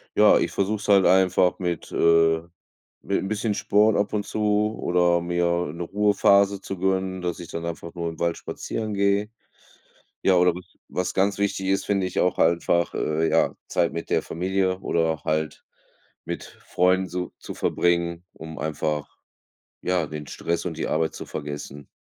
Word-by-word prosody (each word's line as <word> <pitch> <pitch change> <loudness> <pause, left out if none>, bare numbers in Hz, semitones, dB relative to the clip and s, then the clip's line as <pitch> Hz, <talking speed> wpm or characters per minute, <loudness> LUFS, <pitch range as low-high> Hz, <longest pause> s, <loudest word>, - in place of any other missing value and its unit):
ja, - - +6
ich - - 0
versuche 100 +2 0
es 105 - -8
halt 100 -3 +6
einfach 90 -1 +3
mit 85 -3 -3
äh, 80 -1 +3 0.6
mit - - -1
'n - - -3
bisschen 105 0 -1
Sport 105 +1 +3
ab 100 +1 0
und 105 -1 -1
zu, 105 0 0
oder 85 -1 +2
mir 85 0 0 0.3
'ne 85 - -7
Ruhephase 100 0 +3
zu 95 - -6
gönnen, 95 0 -1
dass 90 0 -2
ich 85 - -9
dann 85 0 -5
einfach 85 0 -6
nur 85 -1 -2
im 80 - -10
Wald 85 -1 0
spazieren 110 -2 -5
gehe. 100 +2 +1 0.9
Ja, 95 - +4
oder 90 -1 +4
was 90 - -12
was 90 0 -2
ganz 100 +1 +2
wichtig 100 -1 -1
ist, 95 - +1
finde 100 -2 +1
ich - - -4
auch 90 0 +1
einfach, 85 +1 +2
äh, 80 +1 0
ja, - - +2
Zeit 85 - +1
mit 85 - -5
der - - +1
Familie 95 +2 -1
oder 80 -1 +1
auch 80 -1 -5
halt 80 0 -2 0.6
mit - - -4 0.2
Freunden 95 +1 +2
zu 90 0 -5
zu - - -8
verbringen, 85 0 0
um 80 0 -9
einfach, 75 -1 -3 0.6
ja, 90 -4 0
den 75 0 -7
Stress 85 +1 -3
und 85 - -3
die - - -2
Arbeit 80 +1 0
zu - - -7
vergessen. 70 -1 -7
90 Hz, 175 wpm, -24 LUFS, 85-95 Hz, 0.9 s, ja